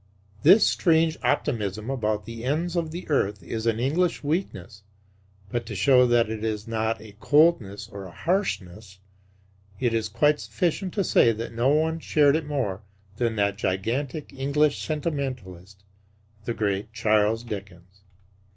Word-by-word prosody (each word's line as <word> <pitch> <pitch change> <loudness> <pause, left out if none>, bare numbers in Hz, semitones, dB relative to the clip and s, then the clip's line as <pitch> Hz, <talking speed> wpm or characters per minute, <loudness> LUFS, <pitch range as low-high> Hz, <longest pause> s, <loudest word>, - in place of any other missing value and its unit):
This 190 +8 +7
strange 160 -2 +2
optimism 110 -6 -1
about 110 -5 -1
the 115 0 -8
ends 160 +7 -1
of 170 -2 -1
the 170 +3 -7
earth 105 - 0
is 110 +6 -4
an 115 -1 +1
English 160 +9 0
weakness; 140 - -3 0.7
but 120 +3 -2
to 110 - -6
show 125 +5 +5
that 120 -1 +3
it 110 0 -5
is 110 -1 -3
not 110 0 -1
a 105 -2 -13
coldness 145 - +2
or 100 -1 -9
a 95 - -10
harshness 105 - -3 0.8
it 120 -2 0
is 110 -1 -1
quite 150 +7 +2
sufficient 165 - -2
to 200 - +1
say 120 - +4
that 115 +2 -6
no 120 +3 +1
one 160 +2 +1
shared 145 -2 +3
it 160 -2 -2
more 120 -10 -2 0.4
than 115 -2 0
that 100 -1 0
gigantic 120 - -2
English 140 +2 +1
sentimentalist 125 - -4 0.6
the 115 - -2
great 100 0 -2
Charles 110 0 +1
Dickens. 95 -4 -9
115 Hz, 150 wpm, -25 LUFS, 105-150 Hz, 0.8 s, This